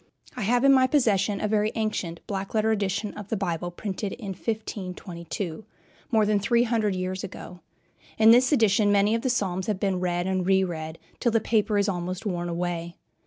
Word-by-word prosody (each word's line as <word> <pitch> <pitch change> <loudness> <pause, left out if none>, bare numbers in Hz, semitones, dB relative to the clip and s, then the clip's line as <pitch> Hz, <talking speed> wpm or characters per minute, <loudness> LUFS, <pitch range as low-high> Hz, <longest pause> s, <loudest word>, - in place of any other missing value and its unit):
I - - -5
have 240 +4 +2
in 275 0 +7
my 260 -1 +5
possession 210 -7 +2
a 215 - 0
very 210 0 +1
ancient 205 -6 -3
black 195 +1 -4
letter 220 0 +2
edition 205 0 -1
of 210 -2 -8
the 220 - -2
Bible 175 -3 -2
printed 195 +2 -4
in 220 -5 -7
1522, 185 -3 -5 0.5
more 220 -3 +3
than 210 -1 +2
three 235 +4 +2
hundred 220 -4 0
years 185 +1 -3
ago. 180 -1 -8 0.6
In 220 0 +7
this 250 +4 +5
edition 215 -5 +3
many 205 +1 +3
of 230 - 0
the 260 - -1
Psalms 190 -6 -1
have 210 -3 -1
been 195 -2 0
read 175 -1 -1
and 190 -1 0
re 190 +1 +3
read, 160 -3 -5 0.2
till 240 - +1
the 225 - +3
paper 215 -1 +1
is 200 0 +2
almost 185 +1 -3
worn 175 -3 -2
away. 170 0 -3
200 Hz, 195 wpm, -26 LUFS, 180-220 Hz, 0.6 s, in